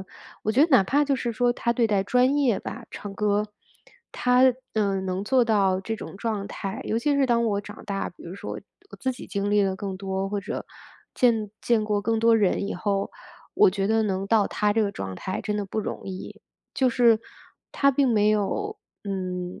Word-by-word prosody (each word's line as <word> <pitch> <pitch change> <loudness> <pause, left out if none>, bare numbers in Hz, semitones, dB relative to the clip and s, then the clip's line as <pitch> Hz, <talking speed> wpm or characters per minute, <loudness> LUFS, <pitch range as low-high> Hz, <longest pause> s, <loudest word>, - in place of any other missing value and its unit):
嗯， 190 - -10 0.4
我 215 - 0
觉 270 +6 +5
得 325 - +4
哪 250 -7 +7
怕 290 +6 +2
就 280 -1 +1
是 240 -2 -2
说 245 +1 +2
她 235 -1 0
对 235 -1 +3
待 205 -3 +1
专 250 +5 +3
业 260 -7 +2
吧 - - -7
唱 205 -1 -7
歌 210 +1 +1 0.7
她， 250 +1 +3 0.3
嗯， 195 -3 0
能 185 +2 -2
做 255 +1 +3
到 195 -4 +2
这 225 +3 -4
种 195 - -9
状 210 -2 -3
态， 195 -1 -5
尤 220 - -1
其 290 +4 +1
是 275 -1 +3
当 235 -1 +2
我 205 -2 0
长 205 +1 -11
大 195 -1 -2
比 - - -17
如 175 +2 -8
说 - - -6 0.4
我 - - -10
自 260 - 0
己 250 - -10
经 200 0 -2
历 205 0 +4
的 190 -1 0
更 195 -2 -4
多， 190 0 -3
或 205 0 -2
者 - - -5 0.5
见 225 -4 +2
见 225 -3 +2
过 210 -1 0
更 225 +1 +1
多 230 0 +5
人 200 -1 +1
以 - - -2
后， 195 +2 -1 0.4
我 - - +6
觉 195 0 -1
得 220 0 +3
能 195 -1 -1
到 215 -2 +4
她 210 -1 0
这 225 - +1
个 200 -1 -1
状 95 - -5
态 185 - -4
真 210 0 -2
的 205 - -2
不 215 +3 -2
容 - - -5
易。 190 -1 -7 0.3
就 260 -1 +3
是 235 -2 +4 0.5
她 275 - +4
并 275 -1 +2
没 210 -2 +3
有， 310 - -1 0.3
嗯， 185 -2 -4
210 Hz, 235 characters per minute, -25 LUFS, 195-235 Hz, 0.7 s, 哪